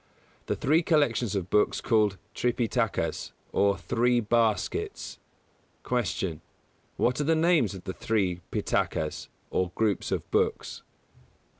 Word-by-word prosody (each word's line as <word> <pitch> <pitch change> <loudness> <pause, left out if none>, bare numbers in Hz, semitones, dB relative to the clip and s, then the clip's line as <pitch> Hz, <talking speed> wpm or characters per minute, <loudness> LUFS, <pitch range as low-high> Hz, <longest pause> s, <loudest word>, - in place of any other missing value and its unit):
The - - 0
three 155 +5 +3
collections 125 - +2
of 95 -1 -3
books 105 - +3
called 105 -4 +2 0.2
Tripitakas 120 -2 -1 0.2
or 100 -1 +2
"Three 120 +8 +1
Baskets". 110 -2 0 0.6
162. 95 -8 -1 0.6
Q. - - +1
_What 125 +2 +1
are - - +1
the 160 +3 +3
names 160 - +3
of 95 - -9
the 95 - -4
three 95 -6 -1
Pitakas, 80 -1 -1 0.2
or 90 -1 0
groups 110 -4 0
of - - -2
books? - - 0
110 Hz, 125 wpm, -28 LUFS, 95-125 Hz, 0.6 s, three